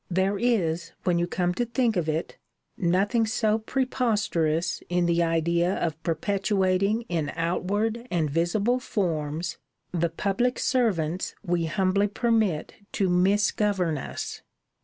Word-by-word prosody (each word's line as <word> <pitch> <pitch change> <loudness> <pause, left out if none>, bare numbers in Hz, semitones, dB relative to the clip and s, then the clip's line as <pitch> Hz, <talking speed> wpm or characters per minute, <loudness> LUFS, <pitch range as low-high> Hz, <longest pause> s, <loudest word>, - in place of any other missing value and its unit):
There 190 +2 +1
is, 170 -8 0
when 175 -2 +2
you 175 - 0
come 180 0 0
to 240 - 0
think 240 -1 0
of 165 -3 0
it, 155 +2 -3 0.4
nothing 200 +6 +2
so 220 -1 +1
preposterous 210 - 0
in 175 0 +2
the 170 0 +2
idea 170 +2 +1
of 160 -2 -2
perpetuating 195 +4 +1
in 165 -9 -2
outward 205 +8 -1
and 165 -3 +1
visible 185 - +1
forms 165 - -2 0.3
the 170 -1 0
public 200 +9 0
servants 185 - 0
we 170 -2 +1
humbly 190 +5 +1
permit 215 -6 0 0.2
to 195 -2 +1
misgovern 190 -2 +2
us. - - -6
185 Hz, 125 wpm, -26 LUFS, 170-215 Hz, 0.4 s, when